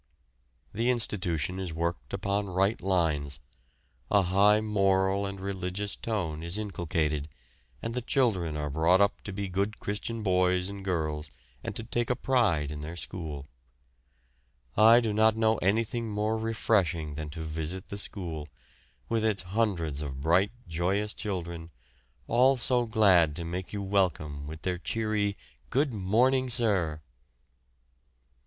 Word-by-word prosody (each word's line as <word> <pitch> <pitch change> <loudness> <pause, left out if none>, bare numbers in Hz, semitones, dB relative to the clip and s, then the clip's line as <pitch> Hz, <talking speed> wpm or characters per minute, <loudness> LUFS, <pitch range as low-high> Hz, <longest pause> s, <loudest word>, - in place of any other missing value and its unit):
The 115 +4 +1
institution 95 -7 0
is 90 -4 -4
worked 85 +1 -2
upon 100 +1 -1
right 95 +4 +1
lines; 80 -7 +1 0.7
a 100 - +4
high 100 +4 +4
moral 100 -2 +2
and 100 0 -6
religious 95 +1 -3
tone 85 -9 -3
is 85 +4 -1
inculcated, 80 -7 -1 0.5
and 115 - -3
the 125 - -2
children 100 - +1
are 75 -1 -3
brought 80 +5 +4
up 100 0 +2
to 100 - -4
be 100 +1 -3
good 100 +3 -2
Christian 110 +2 -3
boys 90 -1 +2
and 100 -1 -7
girls 80 -5 -2 0.3
and - - -4
to - - -5
take 120 +1 -1
a 125 - +2
pride 100 - +1
in 75 -1 -6
their 80 +3 -6
school. 80 -6 -6 1.3
I 115 +3 +7
do 110 -3 -1
not 110 +1 +4
know 110 -1 +3
anything 115 +4 0
more 105 +1 0
refreshing 100 -8 0
than 75 0 -5
to 80 +2 -6
visit 80 +4 -5
the 100 - -5
school, 80 -7 -5 0.6
with 115 -1 0
its 110 -4 +1
hundreds 90 -7 -1
of 70 -3 -5
bright, 85 +7 +3 0.2
joyous 95 +6 0
children, 85 -4 -5 0.6
all 130 +3 +4
so 120 0 +2
glad 95 -9 +4
to 85 - -4
make 90 +2 -4
you 100 -1 -3
welcome 80 -7 0
with 80 +1 -8
their 90 -1 -1
cheery 105 0 -1 0.3
"Good 135 0 +1
morning, 125 +6 +2
sir!" 95 -11 +1
95 Hz, 145 wpm, -29 LUFS, 85-110 Hz, 1.3 s, I